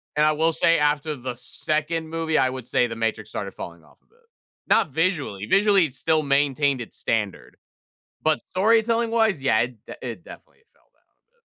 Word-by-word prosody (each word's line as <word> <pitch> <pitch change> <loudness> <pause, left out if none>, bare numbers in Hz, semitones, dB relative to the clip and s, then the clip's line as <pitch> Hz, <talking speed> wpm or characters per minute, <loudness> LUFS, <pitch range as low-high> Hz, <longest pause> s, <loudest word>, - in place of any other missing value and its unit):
And 150 0 +3
I 155 - +4
will 160 +2 +2
say 165 +1 +3
after 150 +1 0
the 125 -1 -5
2nd 155 +5 -2
movie, 160 -1 -1
I 130 - +3
would 130 -2 -7
say 125 - +2
The 115 - -6
Matrix 110 -1 -2
started 100 -3 -5
falling 85 -3 -9
off 75 - -23
a - - -40
bit. 460 - -32 0.5
Not 185 - +3
visually, 145 - -1
visually, 200 - +4
it 140 - -7
still 155 +4 +1
maintained 140 -1 +1
its 115 - -9
standard; 100 - -3 0.7
but 155 -1 +2
storytelling 225 +3 +2
wise, 220 -8 +2
yeah, 135 -5 +3
it 120 -3 -4
de - - -9
it - - -6
definitely - - -14 0.2
fell - - -34
down - - -42
a - - -54
bit. 475 0 -41
150 Hz, 200 wpm, -24 LUFS, 120-165 Hz, 0.7 s, I